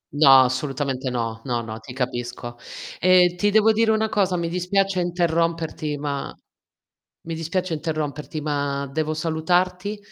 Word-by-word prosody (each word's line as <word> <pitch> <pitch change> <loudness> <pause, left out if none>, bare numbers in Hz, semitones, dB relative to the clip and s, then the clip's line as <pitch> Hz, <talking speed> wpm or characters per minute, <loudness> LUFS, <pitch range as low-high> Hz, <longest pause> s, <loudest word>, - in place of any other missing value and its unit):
No, 135 -3 +8
assolutamente 130 0 -2
no. 115 -2 -3
No 120 -3 -1
no, 110 -1 -7
ti 120 +3 -11
capisco. 120 -1 -4 0.4
Ehm, 180 -1 +5
ti 205 +4 +1
devo 220 +1 +5
dire 220 +1 +2
una 220 0 +1
cosa 190 -4 +1
mi 170 -1 -1
dispiace 185 +2 0
interromperti 165 -3 -1
ma 140 -1 -3 0.9
mi 165 - -5
dispiace 165 +3 -2
interromperti 155 -1 -4
ma 140 -2 -2
devo 155 +1 -1
salutarti, 180 +5 0
160 Hz, 135 wpm, -23 LUFS, 140-180 Hz, 0.9 s, No